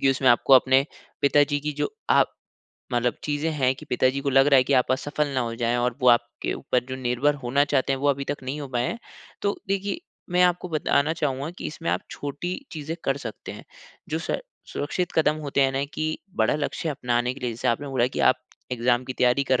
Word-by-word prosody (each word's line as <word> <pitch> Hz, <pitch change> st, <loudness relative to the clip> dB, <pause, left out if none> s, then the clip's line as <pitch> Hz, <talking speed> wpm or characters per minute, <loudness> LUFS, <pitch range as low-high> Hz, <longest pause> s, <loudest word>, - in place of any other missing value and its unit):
कि 135 Hz, -, +4 dB
उसमें 130 Hz, -1 st, +2 dB
आपको 120 Hz, +3 st, +4 dB
अपने 130 Hz, +1 st, +5 dB, 0.4 s
पिताजी 145 Hz, 0 st, +4 dB
की 150 Hz, +1 st, -3 dB
जो -, -, 0 dB, 0.2 s
आप -, -, +4 dB, 0.6 s
मतलब 120 Hz, 0 st, +1 dB
चीज़ें 150 Hz, +2 st, -1 dB
हैं 130 Hz, -3 st, +2 dB
कि 155 Hz, -, -12 dB
पिताजी 130 Hz, 0 st, +1 dB
को 140 Hz, 0 st, -1 dB
लग 135 Hz, +1 st, +5 dB
रहा 140 Hz, -2 st, +6 dB
है 130 Hz, -, +5 dB
कि 140 Hz, -, 0 dB
आप 130 Hz, -, 0 dB
असफल 145 Hz, +2 st, -1 dB
ना 130 Hz, -, +1 dB
हो 115 Hz, -1 st, -2 dB
जाएँ 120 Hz, +1 st, +2 dB
और 120 Hz, 0 st, 0 dB
वो 125 Hz, -, +4 dB
आपके 120 Hz, 0 st, +2 dB
ऊपर 125 Hz, -1 st, -1 dB
जो 130 Hz, -, -4 dB
निर्भर 130 Hz, +3 st, +1 dB
होना 140 Hz, +4 st, +3 dB
चाहते 135 Hz, -2 st, +1 dB
हैं, 135 Hz, -, -2 dB
वो 145 Hz, -, +2 dB
अभी 140 Hz, 0 st, +1 dB
तक 145 Hz, -1 st, -4 dB
नहीं 135 Hz, +4 st, -4 dB
हो 140 Hz, -, -6 dB
पाए 125 Hz, 0 st, 0 dB
हैं। 230 Hz, -, -4 dB, 0.4 s
तो 200 Hz, 0 st, 0 dB
देखिए, 200 Hz, -, -1 dB, 0.3 s
मैं 180 Hz, 0 st, +4 dB
आपको 180 Hz, 0 st, +2 dB
बताना 155 Hz, -1 st, +1 dB
चाहूँगा 145 Hz, -2 st, -2 dB
कि -, -, -4 dB
इसमें 165 Hz, +2 st, -3 dB
आप -, -, 0 dB
छोटी 145 Hz, +6 st, -4 dB, 0.2 s
चीज़ें 160 Hz, +1 st, -5 dB
कर 135 Hz, 0 st, +1 dB
सकते 110 Hz, -, -7 dB
हैं -, -, -11 dB, 0.4 s
जो 160 Hz, -, -1 dB
स -, -, +1 dB, 0.3 s
सुरक्षित 175 Hz, +5 st, -2 dB
कदम 155 Hz, -1 st, +3 dB
होते 140 Hz, -1 st, -1 dB
हैं 135 Hz, -, +3 dB
ना 135 Hz, +1 st, 0 dB
कि 155 Hz, -, -2 dB, 0.3 s
बड़ा 110 Hz, +5 st, +2 dB
लक्ष्य 150 Hz, +2 st, -3 dB
अपनाने 125 Hz, -3 st, 0 dB
के -, -, -12 dB
लिए, 125 Hz, -, -1 dB
जैसे 120 Hz, +2 st, -2 dB
आपने 140 Hz, +5 st, 0 dB
बोला 130 Hz, -3 st, +2 dB
कि -, -, -4 dB
आप 130 Hz, -, +5 dB, 0.4 s
एग्ज़ाम 120 Hz, +1 st, +1 dB
की 130 Hz, -, -4 dB
तैयारी 125 Hz, +2 st, +2 dB
कर 130 Hz, -, +4 dB
135 Hz, 230 wpm, -25 LUFS, 125-150 Hz, 0.6 s, रहा